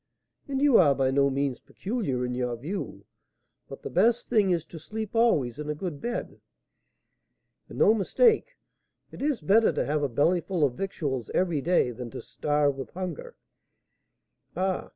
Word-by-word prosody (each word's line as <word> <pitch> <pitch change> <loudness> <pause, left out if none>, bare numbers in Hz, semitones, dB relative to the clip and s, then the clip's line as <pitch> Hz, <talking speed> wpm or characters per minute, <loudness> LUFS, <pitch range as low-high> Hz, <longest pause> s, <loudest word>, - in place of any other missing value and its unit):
"And 275 0 -1
you 285 -5 +6
are 145 -6 +5
by 130 -1 +1
no 140 +1 +3
means 135 -1 -1
peculiar 190 - -3
in 125 - -3
your 125 -1 -2
view; 155 - -6 0.6
but - - -10
the - - -4
best 235 +1 +2
thing 215 -5 +3
is 170 -3 0
to 165 - -10
sleep 215 +5 -6
always 150 - +2
in 150 0 -5
a 150 - -1
good 150 -3 -5
bed." 240 0 -4 1.3
"And - - -9
no 215 - +5
mistake; 460 - +2 0.5
it - - -10
is 280 - 0
better 210 +9 +4
to - - -1
have 150 +1 0
a 145 - 0
bellyful 170 +6 +1
of 135 -4 +2
victuals 140 - -3
every 170 -6 +1
day 170 -5 +2
than 120 0 -7
to - - -7
starve 145 -2 0
with 130 -4 -6
hunger. 190 - -6 1.2
Ah! 190 0 -1
165 Hz, 170 wpm, -27 LUFS, 140-215 Hz, 1.3 s, you